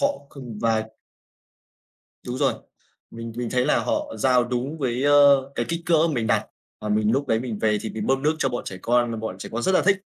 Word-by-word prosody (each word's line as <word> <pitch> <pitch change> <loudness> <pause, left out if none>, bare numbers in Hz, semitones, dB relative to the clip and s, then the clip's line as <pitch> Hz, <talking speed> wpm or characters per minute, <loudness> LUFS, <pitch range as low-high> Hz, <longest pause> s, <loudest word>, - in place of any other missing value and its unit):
họ 285 0 +1
kh - - -14 0.2
và 115 -1 +2 1.4
Đúng 125 - -3
rồi. 135 -3 +2 0.6
Mình 115 0 -7
mình 120 -1 -3
thấy 125 -1 +1
là - - +3
họ 300 -1 -2
giao 125 -2 +3
đúng 125 +6 -3
với, 125 -2 -1
ơ, 140 -2 +5
cái - - -2
kích 170 0 -2
cỡ 170 - +4 0.2
mình 115 -4 -1
đặt - - +1 0.3
và 105 - -4
mình 105 0 +2
lúc 135 +1 0
đấy 110 0 +2
mình 115 -4 -4
về 105 -1 +1
thì 110 - -5
mình 110 -1 -4
bơm 135 0 +1
nước 155 +2 +2
cho 135 - +1
bọn 120 -1 -4
trẻ 95 - -6
con, 120 0 +2
và 115 - -3
bọn 110 -4 -5
trẻ - - -7
con 120 +1 -2
rất 190 - +2
là 185 - +4
thích. 195 -1 +2
125 Hz, 235 wpm, -24 LUFS, 115-145 Hz, 1.4 s, ơ